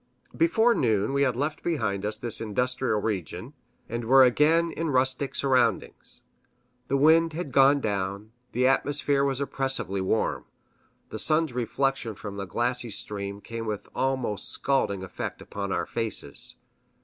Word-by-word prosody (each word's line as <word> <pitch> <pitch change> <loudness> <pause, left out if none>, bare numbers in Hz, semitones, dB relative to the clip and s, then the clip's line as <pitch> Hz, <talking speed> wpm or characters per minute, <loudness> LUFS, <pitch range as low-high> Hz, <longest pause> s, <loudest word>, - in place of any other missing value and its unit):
Before 240 -8 +3
noon 110 - +1
we 140 - +1
had 130 -3 +2
left 145 +4 -2
behind 105 - -1
us 105 - -3
this 120 -1 0
industrial 125 +1 0
region, 100 - -4 0.3
and 120 +1 -4
were 130 +3 +7
again 160 +6 +3
in 165 0 -3
rustic 130 0 +1
surroundings. 125 -6 0 0.6
The 140 - +1
wind 160 +3 +4
had 160 -3 -5
gone 140 +2 +5
down, 100 0 -3 0.2
the 125 +2 +1
atmosphere 140 +1 +2
was 135 -1 0
oppressively 135 -8 -1
warm, 95 +4 0 0.6
the - - -5
sun's 155 -3 +3
reflection 125 -1 -1
from 100 0 -7
the 100 -1 -5
glassy 120 +3 -1
stream 100 -1 -5
came 115 +1 -6
with 105 -2 -4
almost 130 -7 -1
scalding 100 -8 0
effect 95 - -6
upon 100 -1 -5
our - - -1
faces. 115 -2 -2
125 Hz, 145 wpm, -26 LUFS, 105-140 Hz, 0.6 s, were